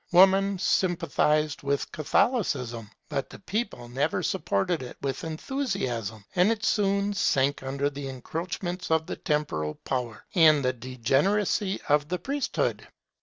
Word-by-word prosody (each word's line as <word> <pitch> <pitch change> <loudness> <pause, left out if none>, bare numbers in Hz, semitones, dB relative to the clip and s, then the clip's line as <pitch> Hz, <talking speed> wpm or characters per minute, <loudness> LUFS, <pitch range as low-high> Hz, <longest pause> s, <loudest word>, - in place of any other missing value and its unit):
Woman 195 +2 +5
sympathized 165 -5 +1
with 140 0 -1
Catholicism, 125 - 0 0.2
but 135 - -3
the - - -10
people 195 - -3
never 140 +6 -1
supported 160 - 0
it 125 - -8
with 135 -1 -2
enthusiasm, 155 - -3
and 180 +4 +4
it 215 -2 -2
soon 200 0 +2
sank 140 -7 +2
under 135 +1 -1
the 140 -1 -5
encroachments 175 +7 -4
of 160 0 +2
the - - -4
temporal 105 - -1
power, 120 -4 -3
and 155 -6 +6
the 130 - +2
degeneracy 140 - +1
of 145 -1 +3
the 180 - 0
priesthood. 275 - -2
155 Hz, 130 wpm, -27 LUFS, 130-190 Hz, 0.2 s, and